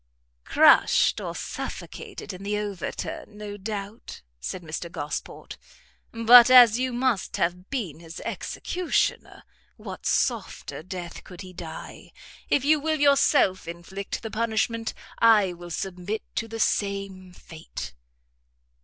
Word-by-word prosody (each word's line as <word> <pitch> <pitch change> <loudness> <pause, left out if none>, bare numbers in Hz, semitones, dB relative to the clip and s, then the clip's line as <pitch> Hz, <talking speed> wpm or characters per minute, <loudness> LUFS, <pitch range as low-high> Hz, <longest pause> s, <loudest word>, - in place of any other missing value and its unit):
"Crushed - - +5
or - - -5
suffocated - - -6
in 185 - -9
the 205 +1 -2
overturn, 205 +1 -5
no 210 -1 -6
doubt," 205 - -7 0.2
said 120 - -5
Mr 165 +2 -5
Gosport; 145 -2 -6 0.5
"but 235 +2 +8
as 245 -3 +8
you 255 0 0
must 245 -4 0
have 180 +2 -1
been 210 - -4
his 165 0 -10
executioner, 360 -1 -2 0.3
what - - -7
softer - - -1
death 175 0 -7
could 180 -2 -11
he 185 -1 -10
die? 165 -3 -9 0.4
If 280 - +2
you 305 +1 +4
will 310 +1 -1
yourself 280 - +3
inflict 175 +6 -6
the 225 - -5
punishment, 225 0 -1 0.2
I 210 -5 +5
will 175 0 -10
submit 185 +5 -4
to 225 - -2
the 225 0 -7
same 195 -3 -1
fate." 165 -2 -9
200 Hz, 125 wpm, -26 LUFS, 180-230 Hz, 0.5 s, but